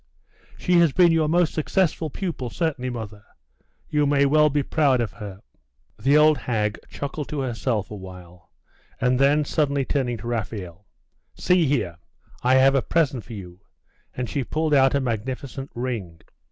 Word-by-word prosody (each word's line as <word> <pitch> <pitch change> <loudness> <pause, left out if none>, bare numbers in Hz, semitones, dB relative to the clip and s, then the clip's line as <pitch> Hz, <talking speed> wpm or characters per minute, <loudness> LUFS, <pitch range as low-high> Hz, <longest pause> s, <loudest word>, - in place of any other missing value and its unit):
'She 180 -1 +3
has 170 -3 +4
been 175 -2 +5
your 160 -2 +2
most 170 +1 +2
successful 160 0 0
pupil, 155 -7 -4
certainly, 140 -4 -2
mother. 110 -4 -7 0.6
You 150 -1 +1
may 140 0 +3
well 150 +2 +4
be 145 0 0
proud 140 -3 +2
of 115 -3 -1
her.' 100 -2 -9 0.6
The 135 +7 +4
old 150 -2 +5
hag 110 -3 -1
chuckled 140 +1 -5
to 150 -2 -3
herself 115 -5 -2
a - - -5
while; 90 -2 -12 0.5
and 125 +1 +2
then 145 +2 +3
suddenly 140 -3 0
turning 125 -3 -1
to 105 - -11
Raphael 105 -5 -5 0.5
'See 180 -3 +2
here! 105 -12 -1 0.4
I 125 +1 +3
have 135 +1 +5
a 135 - +3
present 140 -8 0
for 120 - -10
you;' 90 -4 -9 0.6
and 125 -1 -2
she 140 +1 -2
pulled 155 +4 -1
out 135 0 +4
a - - +3
magnificent 130 +3 -4
ring. 115 -9 -4
130 Hz, 165 wpm, -24 LUFS, 110-150 Hz, 0.6 s, been